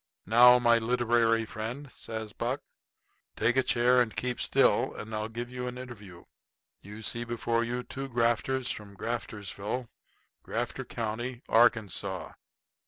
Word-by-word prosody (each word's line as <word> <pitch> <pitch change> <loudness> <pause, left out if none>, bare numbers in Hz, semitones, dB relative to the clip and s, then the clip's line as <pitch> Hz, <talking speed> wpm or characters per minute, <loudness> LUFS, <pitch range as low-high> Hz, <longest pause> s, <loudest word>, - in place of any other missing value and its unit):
"Now, 125 +4 +8
my 120 -1 +4
literary 115 -1 +2
friend," 120 +6 -6
says 110 -2 -7
Buck, 125 +4 -2 0.7
"take 115 +3 +2
a 130 - +5
chair, 125 0 +3
and 110 -3 -1
keep 125 -1 -2
still, - - +3
and 110 +1 -7
I'll 110 +1 -2
give 120 +2 -5
you 125 0 -4
an 125 0 -5
interview. 105 -9 -10 0.6
You 105 +3 -10
see 120 +4 -1
before 115 0 0
you 120 +1 -3
two 135 +2 -6
grafters 120 +2 +1
from 100 -1 -8
Graftersville, 110 +1 -4 0.5
Grafter - - -3
County, 120 +3 -4
Arkansas. 105 -6 +2
120 Hz, 135 wpm, -29 LUFS, 110-125 Hz, 0.7 s, Now